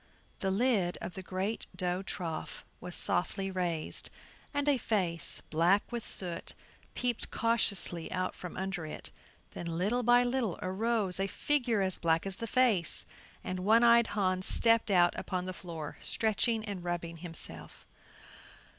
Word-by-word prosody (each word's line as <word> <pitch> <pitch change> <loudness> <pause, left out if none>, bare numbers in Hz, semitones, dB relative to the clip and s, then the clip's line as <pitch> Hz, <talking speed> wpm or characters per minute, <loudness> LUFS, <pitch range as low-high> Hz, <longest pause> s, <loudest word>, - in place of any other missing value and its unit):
The 195 - -1
lid 195 -4 +1
of 180 - -6
the 190 - -6
great 190 +4 -3
dough 180 0 -1
trough 165 -4 -5
was 180 - -6
softly 195 +1 0
raised, 175 -4 -2 0.4
and 285 0 -1
a 280 -3 +3
face, 180 -8 0
black 175 +8 +2
with 235 -2 -4
soot, 175 -3 0 0.4
peeped 245 -2 -1
cautiously 200 -7 0
out 185 0 -1
from 180 - -9
under 190 -4 -3
it. - - -7 0.4
Then 170 - -6
little 210 +8 +1
by 245 +1 +5
little 245 -6 -1
arose 195 0 0
a 195 - +1
figure 245 -1 +1
as 190 -1 +1
black 165 0 +1
as 195 -1 -3
the 230 - -5
face; 220 -9 +3 0.4
and 185 0 -4
One 220 +5 +4
eyed 235 -1 +6
Hans 185 -2 +1
stepped 230 -1 +6
out 175 -3 +4
upon 180 -1 -3
the 185 - -4
floor, 165 -4 -7
stretching 220 +1 +1
and 200 -4 -5
rubbing 170 -1 -4
himself. 165 -1 -6
190 Hz, 150 wpm, -31 LUFS, 175-230 Hz, 0.4 s, eyed